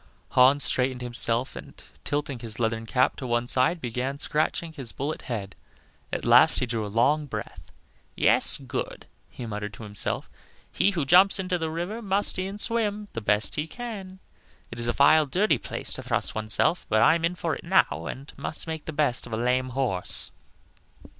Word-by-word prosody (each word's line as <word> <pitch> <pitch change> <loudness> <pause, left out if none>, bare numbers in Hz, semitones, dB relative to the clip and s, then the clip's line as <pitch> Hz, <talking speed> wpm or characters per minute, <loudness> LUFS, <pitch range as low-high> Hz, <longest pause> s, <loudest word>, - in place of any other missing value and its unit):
Hans 130 +2 +5
straightened 125 -1 +1
himself, 120 +1 0
and - - -10 0.3
tilting 145 -3 -3
his 115 -1 -5
leathern 115 -1 -1
cap 130 +3 +1
to 130 - -6
one 120 0 0
side, 130 +8 +2
began 125 +1 -3
scratching 160 +2 -2
his 135 -7 -4
bullet 145 +4 -4
head; 100 -6 -5 0.6
at - - -4
last - - +6
he - - +1
drew 115 -2 -2
a - - -4
long 145 +8 +1
breath. - - -8 0.4
"Yes, - - +5
good," - - -6 0.2
he 120 - -8
muttered 105 -1 -5
to - - -11
himself; 105 -1 -1 0.4
"he - - +2
who 170 -8 -2
jumps 185 +8 +6
into 185 -2 -2
the 160 -1 -2
river 175 +8 -4
must 200 -2 0
e'en 195 +2 -4
swim 210 -2 +1
the 115 - -4
best 105 0 +1
he 150 +1 -2
can. 200 -4 -8 0.5
It 115 - -7
is 120 - -3
a - - +2
vile, 150 +2 +5
dirty 175 - +1
place - - -5
to - - -5
thrust - - -2
one's 110 -1 -2
self; 175 - +1
but 110 0 +3
I 160 - +6
am 165 0 -2
in 170 +2 0
for 170 -2 -2
it - - -11
now, 170 - +1
and 135 +3 -9
must 155 - -5
make 160 -2 -6
the 160 - -6
best 145 -5 0
of 115 - -9
a - - -1
lame 125 +2 0
horse." 120 -8 +2
135 Hz, 190 wpm, -25 LUFS, 120-170 Hz, 0.6 s, last